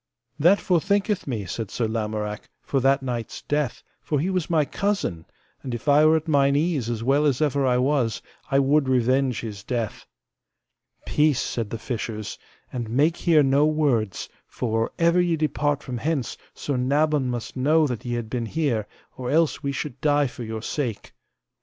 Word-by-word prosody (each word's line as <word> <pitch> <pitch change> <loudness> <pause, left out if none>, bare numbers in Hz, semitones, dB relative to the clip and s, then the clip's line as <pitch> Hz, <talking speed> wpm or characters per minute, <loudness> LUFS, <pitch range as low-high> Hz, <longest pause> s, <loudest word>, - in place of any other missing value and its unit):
That 175 +7 +6
forthinketh 195 +2 +1
me, 110 -7 -3
said 110 +4 -4
Sir 115 +3 -1
Lamorak, 105 -1 -3
for 135 - 0
that 135 +1 +3
knight's 120 -3 -4
death, 145 -4 -1 0.2
for 150 - -1
he 180 +6 0
was 185 -4 -1
my 160 -3 +3
cousin; 195 - -2 0.4
and 125 -3 -4
if 120 - -9
I 150 +2 +6
were 160 - +5
at 160 +1 -5
mine 140 -2 +3
ease 145 -6 0
as 115 -1 -3
well 140 +4 +3
as 135 -4 +1
ever 145 -3 +1
I 125 -1 +3
was, 125 -4 +1 0.3
I 135 - +2
would 140 0 +3
revenge 130 0 +2
his 105 -4 -7
death. 115 -3 -3 1.0
Peace, 150 -3 +2
said 115 -3 -2
the 115 - -4
fishers, 115 -2 -5 0.3
and 120 -3 -4
make 145 +8 +2
here 160 -4 +4
no 140 +2 +4
words, 135 -10 0 0.2
for 115 -2 -1
or - - -10
ever 170 +1 +4
ye 175 -2 +2
depart 145 -1 0
from 125 -3 -5
hence 145 -2 -1 0.2
Sir 140 -3 -2
Nabon 140 +1 +1
must 120 -2 -4
know 150 +5 +3
that 125 -6 -3
ye 120 -1 -2
have 120 -2 -3
been 115 0 -3
here, 125 -8 -1 0.3
or 125 -1 -5
else 160 +2 +2
we 140 -2 -1
should 135 -1 -5
die 145 -1 +3
for 125 -1 -7
your 110 -1 -5
sake. 120 -8 -3
135 Hz, 185 wpm, -24 LUFS, 115-150 Hz, 1.0 s, That